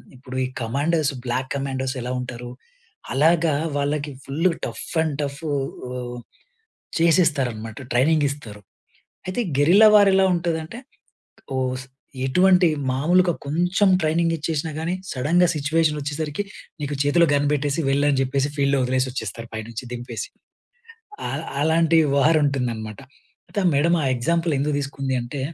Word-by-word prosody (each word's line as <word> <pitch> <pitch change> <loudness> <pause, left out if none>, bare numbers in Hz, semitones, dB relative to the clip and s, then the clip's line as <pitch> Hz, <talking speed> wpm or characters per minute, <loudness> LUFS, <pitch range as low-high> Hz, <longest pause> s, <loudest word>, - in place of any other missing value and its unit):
ఇప్పుడు 130 0 -10
ఈ - - +1 0.2
commanders 145 +6 0
black 130 +2 -2
commanders 135 -1 -2
ఎలా 125 +1 -4
ఉంటారు? 125 -1 -6 0.6
అలాగా 160 +2 +3 0.2
వాళ్ళకి 145 +1 -1
ఫుల్ 155 +6 -3 0.2
టఫ్ - - -5 0.2
అండ్ 155 -3 -1
టఫ్ 140 -1 -4 0.5
ఆహ్ 125 -1 -5 0.8
చేసిస్తారన్నమాట, 135 -10 +1 0.2
ట్రైనింగ్ 150 +5 +3
ఇస్తారు. 115 -8 -8 0.7
అయితే 185 +6 -2 0.2
గెరిల్లా 190 +9 +7
వార్ 205 -1 +7
ఎలా 190 0 +4
ఉంటదంటే 170 +4 -3 0.8
ఓస్ 130 0 -2 0.4
ఎటువంటి 180 +4 +4 0.2
మామూలుగా 175 +6 +3
కొంచెం 180 +6 +2
ట్రైనింగ్ 165 +1 +1
ఇచ్చేసినా 160 0 -2
కానీ 170 +3 -1 0.2
సడెన్‌గా 165 +7 +2
సిట్యుయేషనొచ్చేసరికి 150 +1 -1 0.4
నీకు 145 0 -2
చేతిలో 170 +4 +4
గన్ 145 0 +2
పెట్టేసి 145 +1 0
వెళ్ళని 140 0 +2
చెప్పేసి 135 +2 0
ఫీల్డ్‌లో 140 -1 +2
వదిలేసొచ్చేస్తారు 125 -3 -2
పైనుంచి 115 +2 -6
దింపేసి. 120 0 -5 1.0
ఆ! - - -3 0.3
అలాంటి 165 +1 +3 0.2
వార్ 155 +3 +4
ఉంటుందనమాట. 115 -6 -2 0.5
అయితే 200 - -1
మేడం 170 +5 +3
ఆ - - 0
ఎక్సాంపుల్ 165 +6 0
ఎందుకు 145 +2 0
తీసుకుంది 135 -1 -3
అంటే, 130 +4 -6
145 Hz, 120 wpm, -23 LUFS, 130-165 Hz, 1.0 s, గెరిల్లా